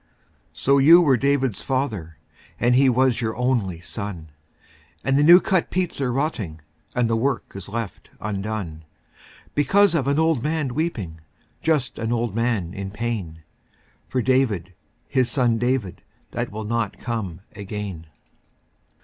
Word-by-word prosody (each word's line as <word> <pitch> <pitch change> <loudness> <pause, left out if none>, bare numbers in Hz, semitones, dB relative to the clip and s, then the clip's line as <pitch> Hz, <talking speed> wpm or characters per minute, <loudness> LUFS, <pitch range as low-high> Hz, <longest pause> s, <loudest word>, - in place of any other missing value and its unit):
lO 140 +1 +5
you 165 +6 +8
were 145 -7 +4
David's 135 -4 +1
father, 110 - -2 0.4
And 120 +1 +3
he 135 +1 +5
was 125 -1 +2
your 110 -1 -2
only 120 -9 0
son, 90 -3 -6 0.7
And 135 - +2
the 145 - +4
new 175 +4 +9
cut 185 -2 +1
peats 180 -5 -1
are 130 -2 +1
rotting 120 - -2 0.3
And 125 -2 +2
the 115 - +1
work 125 +3 -1
is 100 -1 -8
left 115 -1 -5
undone. 100 -6 -4 0.7
Because 195 +8 +4
of 140 -5 +1
an 140 +1 +2
old 160 -5 +2
man 150 -3 -1
weeping, 105 - -3 0.4
Just 150 -6 0
an 115 0 -2
old 120 -3 0
man 115 -6 0
in 100 0 -5
pain. 100 -7 -4 0.7
For 130 -2 0
David, 110 -9 +1 0.3
his 130 -2 +1
son 120 -3 +2
David, 120 -6 -1 0.3
That - - -3
will 110 +1 -5
not 115 +1 -1
come 105 -8 -4
again. 100 -5 -6
120 Hz, 145 wpm, -23 LUFS, 100-135 Hz, 0.7 s, new